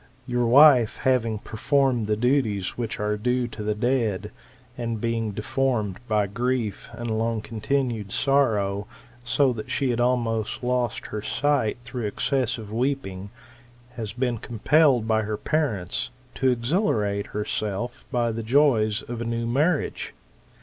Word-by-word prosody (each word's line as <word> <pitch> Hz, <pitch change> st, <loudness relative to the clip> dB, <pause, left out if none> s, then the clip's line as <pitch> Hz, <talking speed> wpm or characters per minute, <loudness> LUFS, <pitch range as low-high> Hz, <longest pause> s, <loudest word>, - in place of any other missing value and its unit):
Your 125 Hz, -2 st, 0 dB
wife, 130 Hz, -3 st, +7 dB
having 115 Hz, -4 st, +1 dB
performed 125 Hz, +1 st, 0 dB
the 105 Hz, -, +2 dB
duties 110 Hz, -5 st, +1 dB
which 115 Hz, -3 st, -4 dB
are 105 Hz, 0 st, 0 dB
due 125 Hz, +3 st, 0 dB
to 110 Hz, -, -8 dB
the 105 Hz, 0 st, -1 dB
dead, 110 Hz, -3 st, 0 dB, 0.4 s
and 115 Hz, -2 st, -3 dB
being 115 Hz, -1 st, -1 dB
deformed 105 Hz, -1 st, -1 dB
by 105 Hz, -2 st, +2 dB
grief 115 Hz, +1 st, -2 dB
and 115 Hz, -2 st, -3 dB
long 115 Hz, 0 st, 0 dB
continued 115 Hz, -1 st, -2 dB
sorrow, 105 Hz, -8 st, +1 dB, 0.4 s
so 125 Hz, +2 st, +2 dB
that 110 Hz, -2 st, -7 dB
she 135 Hz, -3 st, 0 dB
had 120 Hz, -, -1 dB
almost 120 Hz, -3 st, 0 dB
lost 125 Hz, -2 st, -1 dB
her 105 Hz, -, -2 dB
sight 140 Hz, -2 st, 0 dB
through 120 Hz, -3 st, -3 dB
excessive 115 Hz, -1 st, -1 dB
weeping, 115 Hz, -6 st, -2 dB, 0.6 s
has 110 Hz, -4 st, -5 dB
been 125 Hz, -1 st, -1 dB
compelled 125 Hz, +1 st, +3 dB
by 110 Hz, -1 st, +2 dB
her 110 Hz, 0 st, -3 dB
parents 120 Hz, -, -1 dB, 0.2 s
to 130 Hz, -, +1 dB
exhilarate 115 Hz, -, 0 dB
herself 105 Hz, +2 st, -3 dB
by 120 Hz, -2 st, +1 dB
the 115 Hz, +1 st, -4 dB
joys 115 Hz, -4 st, +3 dB
of 120 Hz, -1 st, -6 dB
a -, -, -1 dB
new 115 Hz, 0 st, -2 dB
marriage. 145 Hz, +7 st, 0 dB
115 Hz, 140 wpm, -25 LUFS, 105-125 Hz, 0.6 s, wife